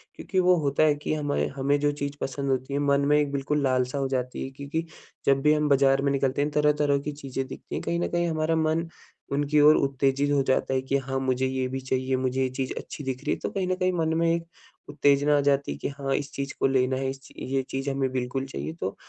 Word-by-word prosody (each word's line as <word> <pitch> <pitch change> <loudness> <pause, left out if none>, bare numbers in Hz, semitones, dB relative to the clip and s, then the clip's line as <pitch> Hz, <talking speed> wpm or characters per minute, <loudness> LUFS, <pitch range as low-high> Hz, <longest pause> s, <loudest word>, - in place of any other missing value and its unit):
क्योंकि 190 - -2
वो 180 0 +5
होता 140 +1 +2
है 150 -1 +4
कि 145 +1 -3
हमाए 145 -2 0
हमें 140 +1 +1
जो 145 0 +2
चीज़ 140 0 -4
पसंद 140 +1 -3
होती 130 +1 -2
है 140 - +1
मन 140 -1 +2
में 150 +1 +4
एक 145 -1 0
बिल्कुल 145 +1 -1
लालसा 130 0 +1
हो 135 -1 0
जाती 125 -1 -2
है। - - -5
क्योंकि 140 +4 -4 0.4
जब 135 0 +3
भी 150 +2 +5
हम 150 -1 +1
बाज़ार 135 -1 +4
में 140 0 +1
निकलते 135 0 0
हैं 145 +1 0
तरह-तरह 150 -1 +2
की 150 - -4
चीज़ें 135 -2 -5
दिखती 135 - -8
हैं - - -2
कहीं 170 - -1
न - - 0
कहीं 175 0 +1
हमारा 160 0 0
मन 160 +1 +1 0.4
उनकी 145 +1 +2
ओर 150 +1 +8
उत्तेजित 135 +1 +1
हो 140 -1 +3
जाता 130 0 +1
है 130 - +1
कि 135 +1 0
हाँ, 135 0 -3
मुझे 130 0 0
ये 130 0 -1
भी 135 +1 -3
चाहिए, 130 0 -1
मुझे 130 0 -1
ये 130 - +1
चीज़ 130 0 -3
अच्छी 145 - -7
दिख 130 0 -4
रही - - +1
है। - - -3
तो - - -3
कहीं 190 -2 -2
न 185 - +1
कहीं 185 0 +1
मन 160 -2 0
में 165 0 +2
एक 170 0 -2 0.4
उत्तेजना 145 0 +3
आ - - +3
जाती 140 - +1
है 70 - -5
कि - - -3
हाँ, 135 -1 -1
इस 145 0 -3
चीज़ 140 0 -4
को - - +3
लेना 130 -1 +2
है 135 0 -1
इस 135 0 -8
ये 135 +1 -1
चीज़ 135 +1 -2
हमें 135 -1 0
बिल्कुल 130 +1 -2
चाहिए। 135 +3 -5
तो 95 - -3
140 Hz, 260 wpm, -26 LUFS, 135-150 Hz, 0.4 s, ओर